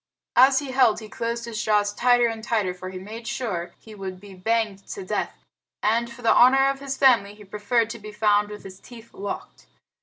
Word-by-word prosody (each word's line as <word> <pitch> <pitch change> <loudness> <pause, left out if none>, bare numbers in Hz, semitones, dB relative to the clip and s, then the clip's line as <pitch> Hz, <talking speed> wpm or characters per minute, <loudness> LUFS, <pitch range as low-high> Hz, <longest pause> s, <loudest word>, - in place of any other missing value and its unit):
As 265 +2 +6
he 275 -1 -2
held 255 -4 +3
he 220 - -10
closed 235 +2 -4
his 230 -1 -4
jaws 205 -1 +2
tighter 245 +2 +3
and 225 -1 -3
tighter, 210 -6 0
for 185 +1 -8
he 185 - -7
made 220 +5 -9
sure 200 -9 -4
he 220 - -14
would 190 -2 -7
be 200 0 -13
banged 215 +1 -1
to 390 - -7
death, - - -3 0.5
and, 235 +2 +1
for 245 +1 -12
the 225 - +5
honor 270 +2 +6
of 275 - -7
his 275 -1 -5
family, 230 -7 +4
he 210 - -14
preferred 210 +3 0
to 235 - -7
be 215 0 -9
found 210 -1 +2
with 210 0 -9
his 190 0 -11
teeth 235 -2 -14
locked. 200 +1 -7
220 Hz, 215 wpm, -24 LUFS, 205-240 Hz, 0.5 s, As